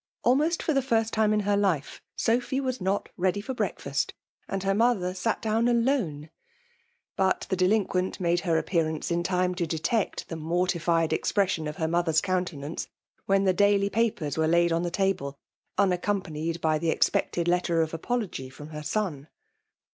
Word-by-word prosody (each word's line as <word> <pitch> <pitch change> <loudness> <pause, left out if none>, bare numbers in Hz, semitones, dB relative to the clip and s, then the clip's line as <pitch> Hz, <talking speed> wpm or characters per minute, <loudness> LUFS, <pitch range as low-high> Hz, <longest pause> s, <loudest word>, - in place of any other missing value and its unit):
Almioat 300 +7 +3
for 315 - +1
the 275 - +3
first 225 -3 0
time 215 -1 +3
in 210 0 +2
her 205 0 +1
life, 190 -8 0
Sophy 245 +3 +1
was 260 -2 -2
not 195 +2 -1
ready 185 +2 +1
'for 215 +6 -4
fareakfast, - - -2 0.4
and 195 -1 -2
her 195 0 +2
mother 205 -4 +2
sat 210 +4 -2
down 225 +2 +2
alone 230 - 0 0.4
( - - -43
But 190 -1 +2
the - - +3
delinquent 185 -1 +1
made 175 -1 +2
her 165 -3 +1
appearahce 160 -2 -1
in 170 0 +1
time 180 0 +1
to 175 -2 -2
detect 165 +7 -1
the 165 - -5
mortified 170 0 +1
expression 185 -6 0
ot 150 - -5
her 160 - -1
mother 170 +1 +1
s 160 - +5
countenance, 175 -5 -3 0.4
when 195 0 +3
the 190 -1 +3
daily 200 +1 +3
papers 190 -10 0
were 160 - +3
laid 170 +1 +3
on 165 0 +1
the 175 - -1
table, 185 -7 -1 0.4
unaccompanied 180 -4 0
by 155 -1 +2
thij 165 +1 0
expected 170 +1 +1
letter 175 -2 +2
of 160 - -5
apology 180 - -3
from 150 +3 -11
her 150 -1 -6
eon. 155 -7 -2
185 Hz, 175 wpm, -27 LUFS, 165-205 Hz, 0.4 s, s